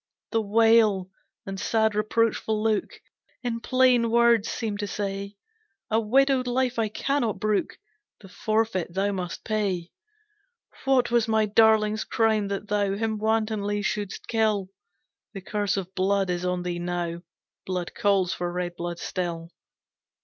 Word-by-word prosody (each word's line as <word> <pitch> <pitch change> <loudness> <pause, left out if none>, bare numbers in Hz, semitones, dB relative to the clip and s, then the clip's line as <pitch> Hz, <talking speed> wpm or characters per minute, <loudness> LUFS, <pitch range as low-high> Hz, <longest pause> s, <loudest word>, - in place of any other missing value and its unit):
"The 225 - +2
wail 215 -3 +3 0.3
and 195 0 -5
sad 220 +1 +1
reproachful 215 0 0
look 220 -2 -1 0.4
In 235 -2 -2
plain 250 -1 +3
words 235 -2 +4
seemed 215 -3 -3
to 205 - -2
say, 200 0 -4 0.6
A 220 - +3
widowed 260 +3 +2
life 250 -1 0
I 220 -1 +1
cannot 240 -2 -1
brook, 210 0 0 0.4
The 195 - -13
forfeit 215 -3 -1
thou 200 +1 +1
must 180 -3 -5
pay. 195 -5 -1 0.9
"What 260 -3 +3
was 235 -2 +3
my 220 -1 +2
darling's 215 0 +3
crime 220 -2 +1
that 200 +1 -4
thou 200 -1 0
Him 220 0 -2
wantonly 215 -2 0
shouldst 205 -2 -3
kill? 215 -4 +1 0.7
The 195 - -5
curse 205 +1 -1
of 190 -1 -5
blood 195 0 +1
is 175 0 -2
on 180 0 -1
thee 175 -1 -3
now, 175 -1 -3 0.5
Blood 180 -2 -3
calls 195 -3 +2
for 175 0 -3
red 175 0 -3
blood 175 0 -4
still. 170 -2 -4
210 Hz, 140 wpm, -26 LUFS, 190-225 Hz, 0.9 s, words